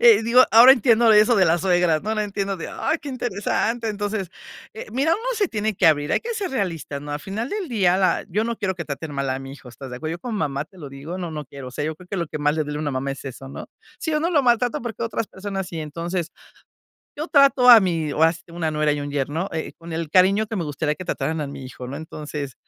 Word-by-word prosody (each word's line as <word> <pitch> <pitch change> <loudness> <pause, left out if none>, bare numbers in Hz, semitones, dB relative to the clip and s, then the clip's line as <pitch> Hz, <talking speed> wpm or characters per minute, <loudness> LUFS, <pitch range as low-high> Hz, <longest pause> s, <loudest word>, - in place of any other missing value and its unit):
Eh, 470 - +7
digo, 235 +3 +6
ahora 235 +4 +9
entiendo 235 -2 +5
de 210 - +7
eso 235 +3 +4
de 195 - +4
las 170 0 +2
suegras, 175 -3 +2
¿no? 215 - -2
Ahora 215 -1 0
entiendo 200 -1 -3
de: 165 - -6
"Ay, 320 - -1
qué 290 - -6
interesante". 230 -1 -1
Entonces, 205 -2 -3 0.5
eh, 220 - -7
mira, 275 +6 +1
uno 435 - -1
se 410 -5 +1
tiene 215 -1 -1
que 180 - +2
abrir, 145 -2 +1
hay - - +2
que 470 - -4
ser 400 -5 -3
realistas, 165 - -3
¿no?, 145 - -7
al 145 - -2
final 215 - -4
del 410 -6 -4
día 185 -6 +2
la 190 -1 +1
yo 210 +5 0
no 235 0 -2
quiero 190 -2 -2
que 170 - -5
traten 145 +1 -6
mal 140 -1 -2
a 130 - -1
mi 135 0 -8
hijo, 130 - -14
¿estás 130 +2 -10
de 125 - -6
acuerdo? 155 +5 -4
Yo 170 - -5
como 235 -4 -4
mamá 145 -3 -1
te 185 +3 -20
lo 145 - -8
digo, 140 +7 -7
no, 175 -3 -5
no 150 -1 -5
quiero, 140 -1 -10
o - - -10
sea, 145 - -3
yo 155 0 -3
creo 180 - -15
que 200 - -4
lo 170 -3 -2
que 155 - -5
más 150 +1 +2
le 155 - 0
duele 150 0 -4
a - - -3
una 145 - -1
mamá 130 +1 -2
es 135 +1 -7
eso, 135 0 -8
¿no? - - -8 0.3
Sí 315 -1 -2
uno 325 +3 +1
lo 300 -4 +4
maltrata 240 -1 +2
porque 235 -1 -5
otras 230 -1 -2
personas 195 -1 -5
sí. 165 -2 -6
Entonces, 165 +3 -4 0.9
yo 310 +3 -4
trato 275 -4 +5
a 235 - +11
mí 165 -6 0
o 155 - 0
has 165 0 +1
una 165 -2 -2
nuera 150 0 +1
y 145 - -2
un 145 0 -5
yerno, 145 +7 -2
eh, 160 - -4
con 165 0 -9
el 165 -1 -3
cariño 195 +5 +4
que 220 - -4
me 170 - -2
gustaría 150 +1 -2
que 185 - -7
trataran 155 +2 -2
a 145 - -2
mi 135 -1 -8
hijo, 125 0 -8
¿no? 135 +3 -6
Entonces, 150 -3 -6
175 Hz, 280 wpm, -23 LUFS, 150-220 Hz, 0.9 s, a